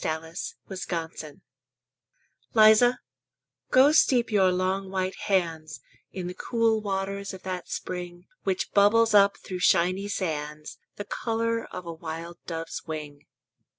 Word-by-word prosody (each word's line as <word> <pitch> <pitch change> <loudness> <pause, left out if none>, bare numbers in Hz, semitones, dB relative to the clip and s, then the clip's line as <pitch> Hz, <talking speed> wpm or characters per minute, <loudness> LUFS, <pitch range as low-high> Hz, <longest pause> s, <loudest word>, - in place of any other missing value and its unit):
SPRING 160 +1 -3 0.6
PASTORAL 160 -3 -5 1.1
Liza, 220 +3 +6 0.7
go 265 +3 +6
steep 250 -7 +3
your 190 -3 +4
long 190 +1 -1
white 190 0 -1
hands 165 -5 -1 0.3
In 185 -2 -5
the 180 - -4
cool 225 +1 +1
waters 195 -1 -3
of 185 - -13
that 185 -1 -5
spring 175 -1 -6 0.2
Which 190 -2 -1
bubbles 220 +3 +4
up 200 -1 +5
through 185 -1 -7
shiny 185 +2 +2
sands 150 -6 -4 0.2
The 205 - -6
color 230 +1 -1
of 180 - -8
a 170 - -5
wild 165 +1 -7
dove's 165 -1 -5
wing. 150 -2 -7
185 Hz, 125 wpm, -26 LUFS, 165-205 Hz, 1.1 s, Liza